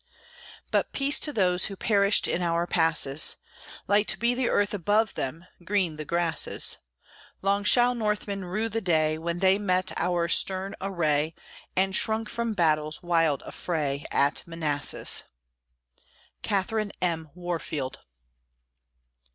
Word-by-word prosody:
But - - 0
peace 280 +1 +3
to 300 - +1
those 185 -7 +2
who 195 - -4
perished 200 0 +2
In 180 - -1
our 170 0 0
passes! 160 -4 +2 0.5
Light 205 +1 +2
be 235 +1 +2
the 250 0 -1
earth 205 +1 +1
above 205 +3 +1
them; 160 +6 -5 0.2
Green 180 -4 -1
the 155 - -5
grasses! 170 0 +1 0.6
Long 200 +1 +1
shall 245 +3 +5
Northmen 210 -3 -2
rue 200 +5 -2
the 225 +1 -3
day 155 -4 +1
When 170 +1 -3
they 190 +2 +3
met 185 -2 0
our 175 -1 0
stern 190 +3 +3
array, 160 -5 -1 0.4
And 190 +1 +1
shrunk 220 0 +2
from 235 -1 -3
battle's 155 -3 +1
wild 165 -5 +1
affray 145 -5 -3
At 140 +1 +2
Manassas. 155 -4 +2 1.2
CATHERINE 205 +1 -1
M. 165 -3 -2
WARFIELD. 165 -6 -4
180 Hz, 125 wpm, -26 LUFS, 160-205 Hz, 1.2 s, shall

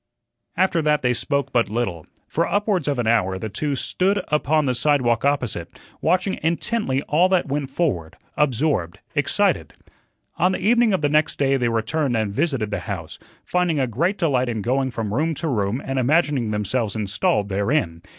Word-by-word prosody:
After 185 -2 +2
that 150 -2 +1
they 125 0 +3
spoke 140 +3 -1
but 115 -4 +2
little. 105 -8 -3 0.2
For - - 0
upwards 205 -4 +1
of 145 -2 0
an 120 - -1
hour 95 -5 +2
the 110 +3 -5
two 140 +8 -2
stood 195 +8 0
upon 150 0 +2
the 130 - +1
sidewalk 125 -4 +2
opposite, 120 -12 -1 0.2
watching 185 +3 +1
intently 165 - -1
all 175 +5 +3
that 185 -2 +2
went 140 -1 -2
forward, 135 - -2 0.2
absorbed, 135 - 0 0.2
excited. - - +1 0.6
On 180 +3 +2
the - - -2
evening 230 +3 +3
of 190 - +1
the - - +4
next 155 +1 +2
day 135 -1 +2
they 125 -3 +1
returned 120 +3 0
and 105 -2 -1
visited 135 -6 0
the - - -1
house, - - -5 0.3
finding 180 -4 +1
a 130 - +2
great 165 - 0
delight 130 -8 +1
in 110 -3 -3
going 130 +3 +1
from 110 -4 -4
room 160 +6 0
to 165 - -3
room 110 -3 0
and 135 0 -1
imagining 140 -3 +2
themselves 105 +1 -1
installed 105 0 0
therein. 100 - 0
135 Hz, 180 wpm, -22 LUFS, 115-160 Hz, 0.6 s, the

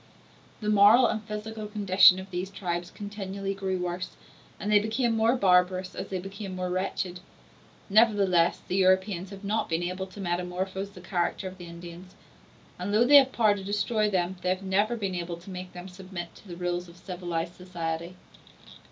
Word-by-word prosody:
The 210 - -1
moral 210 +5 +7
and 215 0 0
physical 215 0 -5
condition 200 -3 +6
of 190 +1 -8
these 180 +2 -3
tribes 175 -3 -3
continually 195 -1 -5
grew 190 -1 -2
worse, 180 +1 -4 0.4
and 210 - -2
they 210 - +7
became 225 +2 0
more 225 +3 +3
barbarous 185 -3 +3
as 190 - -5
they 190 - -2
became 195 +1 -7
more 180 0 -3
wretched. 185 -1 -2 0.7
Nevertheless, 200 -5 +3
the 185 - -1
Europeans 190 0 +2
have 200 0 -10
not 215 +2 -1
been 165 +1 0
able 185 +2 -3
to 190 +2 -13
metamorphose 185 +2 -2
the 185 -2 -13
character 175 +1 -1
of 185 0 -9
the 175 - -9
Indians; 170 +2 -10 0.6
and 185 +3 -3
though 215 +3 +4
they 290 +3 +9
have 270 -2 +7
had 265 - -18
power 215 -3 +5
to 195 - -7
destroy 210 +2 0
them, 185 -1 0
they 180 - -1
have 185 +1 -1
never 205 +5 +1
been 200 -5 -3
able 175 -1 -4
to 175 +3 -11
make 180 0 -7
them 180 +1 -8
submit 185 -2 -8
to - - -17
the 175 - -7
rules 175 0 -2
of 170 - -15
civilized 175 -2 -4
society. 170 -1 -5
190 Hz, 185 wpm, -28 LUFS, 180-205 Hz, 0.7 s, they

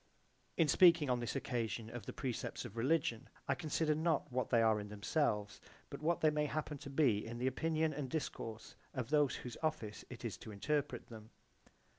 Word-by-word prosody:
(In 165 - +4
speaking 165 -3 +6
on 125 - +2
this 120 +2 -3
occasion 120 -4 -2
of 120 0 -8
the - - -3
precepts 130 -2 -3
of 115 -2 -8
religion 130 0 +1 0.2
I - - +3
consider 155 -1 0
not 155 -2 0
what 125 -1 -1
they 120 - +4
are 110 -1 +4
in 105 - -6
themselves 105 - 0 0.3
but - - -6
what 165 +2 +1
they 155 - +5
may 150 0 +1
happen 150 0 -3
to 140 - -8
be 135 -7 +3
in 115 +1 -6
the 125 - -2
opinion 155 +4 +1
and 140 -2 -4
discourse 115 -6 -4
[?] - - -33
of 130 0 -3
those 150 -3 +4
whose 125 - -7
office 155 -10 -2
it 120 -1 -8
is 105 -6 -3
to 110 - -9
interpret 145 +8 -1
them. 110 -2 -10
130 Hz, 200 wpm, -36 LUFS, 115-155 Hz, 0.3 s, speaking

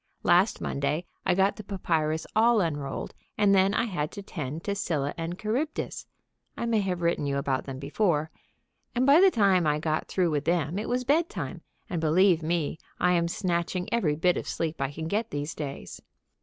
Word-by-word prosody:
Last 180 +5 +3
Monday 140 +5 -1 0.2
I 180 - +3
got 195 +1 +2
the 215 - -7
papyrus 160 -5 -1
all 230 +1 +5
unrolled, 145 -6 -2 0.2
and 205 -1 +4
then 195 +1 +4
I - - +2
had 175 -10 -2
to 200 - -7
tend 155 -4 -5
to 200 - -1
Scylla 150 -8 -1
and 165 +1 -4
Charybdis 245 +10 -3 0.5
(I - - -2
may 230 -2 +2
have 180 -3 -2
written 170 -4 +1
you 140 0 0
about 135 -1 -1
them 135 -1 -6
before), 155 +2 0 0.6
and 250 +2 +2
by 285 +5 +7
the 390 - +8
time 195 - +3
I 150 0 +2
got 155 0 -1
through 180 -3 +1
with 145 -2 -1
them 170 +1 0
it 215 - -4
was 250 +1 0
bedtime, 315 +6 -1 0.3
and, 170 -3 -3
believe 170 +2 +4
me, 160 -1 -1 0.2
I 180 - +3
am 170 -1 +2
snatching 175 0 -1
every 170 -11 +2
bit 175 +3 +2
of - - -4
sleep 165 -3 -3
I 135 0 -1
can 160 +2 -5
get 215 +5 -1
these 145 +1 -3
days. 140 -3 -7
175 Hz, 195 wpm, -27 LUFS, 155-200 Hz, 0.6 s, the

